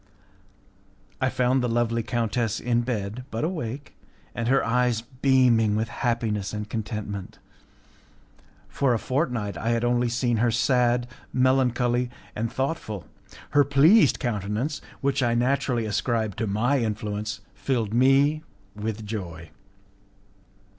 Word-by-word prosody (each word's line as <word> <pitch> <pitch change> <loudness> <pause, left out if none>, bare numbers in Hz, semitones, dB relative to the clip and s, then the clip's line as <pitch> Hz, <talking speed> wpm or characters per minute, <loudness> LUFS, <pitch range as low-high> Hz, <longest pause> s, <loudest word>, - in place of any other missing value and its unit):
I 130 - +3
found 130 +1 +1
the 125 - 0
lovely 115 0 +1
countess 115 0 -1
in 120 -1 +1
bed, 115 -1 -3
but 115 +1 -3
awake, 145 -6 -4 0.4
and 115 0 -3
her 135 +2 +3
eyes 125 -1 +1
beaming 125 -4 +3
with 110 +1 -1
happiness 115 -6 -1
and 105 0 -4
contentment. 105 -3 -5 1.3
For 135 -4 +1
a - - +1
fortnight 125 -5 -2
I 115 - -1
had 115 0 +1
only 120 0 +2
seen 120 0 0
her 120 +2 +3
sad, 120 0 +2 0.2
melancholy, 125 -1 +2 0.3
and 115 +2 -2
thoughtful. 130 - -3 0.5
Her 145 0 +5
pleased 145 - +5
countenance, 115 +5 -2 0.2
which 140 -1 +1
I 120 -2 +2
naturally 125 -1 +1
ascribed 110 -1 -1
to 110 - -1
my 120 +8 +1
influence, 105 -1 -3
filled 115 -6 -1
me 135 +5 +4 0.3
with 110 +1 -4
joy. 85 -7 -6
120 Hz, 125 wpm, -25 LUFS, 110-130 Hz, 1.3 s, Her